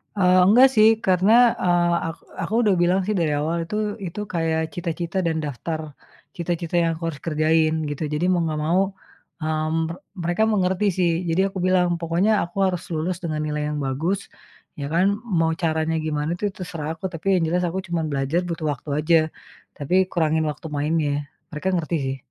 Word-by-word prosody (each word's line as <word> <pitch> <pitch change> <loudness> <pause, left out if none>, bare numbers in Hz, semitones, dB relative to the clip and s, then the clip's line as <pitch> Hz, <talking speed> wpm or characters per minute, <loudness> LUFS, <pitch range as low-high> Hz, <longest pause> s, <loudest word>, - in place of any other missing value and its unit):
Eee, 185 -2 +4
enggak 245 +6 +7
sih, 215 0 +7 0.2
karena, 190 +3 +3 0.3
eee, 175 -1 +3 0.2
ak 165 - -6 0.3
aku - - -6
udah 210 -3 +4
bilang 180 +2 +3
sih 215 - 0
dari 160 -3 +1
awal, 160 +3 -1
itu 190 - -5 0.3
itu 175 +4 -7
kayak 165 -1 0
cita-cita 170 +1 -3
dan 160 -1 0
daftar 155 +3 -4 0.6
cita-cita 170 0 -3
yang 165 - +2
aku 165 - -10
harus 150 - -7
kerjain 155 0 +2 0.2
gitu, 145 +2 -4
jadi 150 +4 0
mau 175 - +2
nggak 155 -1 -2
mau, 175 +4 +3 0.6
eee, 155 0 -1
mer 165 +1 -1 0.3
mereka 175 +5 +1
mengerti 190 0 +1
sih. 175 -2 +3 0.2
Jadi 165 +3 +2
aku 195 - -8
bilang 185 -1 +3
pokoknya 170 +6 +1
aku 175 +3 -14
harus 180 -2 -1
lulus 165 +3 -1
dengan 155 -2 -2
nilai 150 0 -2
yang - - -3
bagus 160 +9 -1 0.6
ya 140 - -4
kan, 180 +3 +4 0.2
mau 165 -7 +1
caranya 160 -1 0
gimana 150 +1 -1
tuh 205 0 -2
terserah 165 -4 -5
aku, 185 +4 -5
tapi 165 +1 -8
yang 180 -3 +2
jelas 180 +1 +1
aku 185 +2 -2
cuman 170 -2 -1
belajar 140 +6 0
butuh 165 -3 -3
waktu 140 +2 -11
aja, 165 +2 +4 0.6
tapi 180 +6 +2
kurangin 160 -2 +1
waktu 150 +1 -4
mainnya. 145 -1 0 0.2
Mereka 185 +5 -2
ngerti 170 -1 -1
sih. 135 0 -2
165 Hz, 185 wpm, -23 LUFS, 155-180 Hz, 0.6 s, enggak